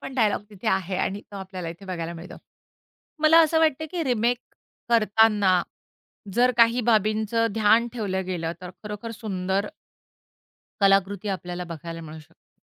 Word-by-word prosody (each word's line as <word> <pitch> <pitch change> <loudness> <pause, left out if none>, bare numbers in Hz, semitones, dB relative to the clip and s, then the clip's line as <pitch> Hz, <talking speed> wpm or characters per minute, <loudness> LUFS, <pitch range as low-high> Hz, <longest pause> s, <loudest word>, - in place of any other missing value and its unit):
पण 265 - -8
डायलॉग 215 -5 +1
तिथे 210 +2 -4
आहे 190 -1 0
आणि 195 +2 -2
तो 200 - -8
आपल्याला 185 -3 -6
इथे 170 +4 -9
बघायला 170 -2 -4
मिळतो. 170 +2 -10 0.9
मला 315 +1 +7
असं 320 +1 +2
वाटत, 315 -2 +2
की 350 -2 -2
रिमेक 240 -1 +1 0.5
करताना 215 -5 +4 0.7
जर 250 +1 +4
काही 235 +1 +5
बाबींचं 220 0 +2
ध्यान 225 +2 +4
ठेवलं 190 -5 -2
गेलं, 170 -3 -3
तर 180 -1 -8
खरोखर 210 +2 -6
सुंदर 195 -3 -2 1.1
कलाकृती 195 +1 +2
आपल्याला 180 -1 -6
बघायला 165 +1 -7
मिळू 160 -1 -9
शकते. 165 +2 -26
205 Hz, 140 wpm, -25 LUFS, 185-230 Hz, 1.1 s, मला